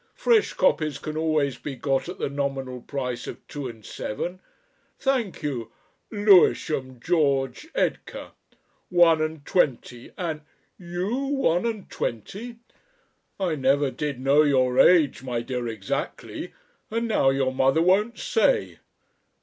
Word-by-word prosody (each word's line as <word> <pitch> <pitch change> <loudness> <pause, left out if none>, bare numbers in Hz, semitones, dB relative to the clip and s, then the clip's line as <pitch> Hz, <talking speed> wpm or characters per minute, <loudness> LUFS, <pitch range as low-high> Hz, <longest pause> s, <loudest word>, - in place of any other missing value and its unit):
Fresh 475 -3 +3
copies 155 -4 +1
can 155 - -6
always 155 -4 0
be 145 -3 -6
got 135 +4 -1
at 180 - -6
the - - -2
nominal 135 -3 -3
price 125 -3 -4
of - - -9
two 145 -3 -5
and 110 -4 -11
seven. 175 - -5 0.6
Thank 250 - -1
you... 120 -6 -3 0.4
Lewisham, 175 - +3
George 140 - 0
Edgar. - - -2 0.6
One 170 -3 +5
and 155 -2 -3
twenty. 125 -7 -1
And... 160 -4 -3 0.4
You 185 +9 -3
one 270 -9 +1
and 220 -4 -4
twenty! 205 - -5 0.8
I 185 -4 0
never 140 -1 +2
did 145 -3 -4
know 140 +3 +4
your 130 -4 +2
age, 160 -8 +5
my 125 -3 -3
dear, 125 0 -3
exactly, 110 -4 -4 0.4
and 230 +1 -1
now 210 -11 +3
your 135 -1 +1
mother 135 +5 +3
won't 205 +6 +2
say. - - +1
150 Hz, 130 wpm, -25 LUFS, 130-185 Hz, 0.8 s, One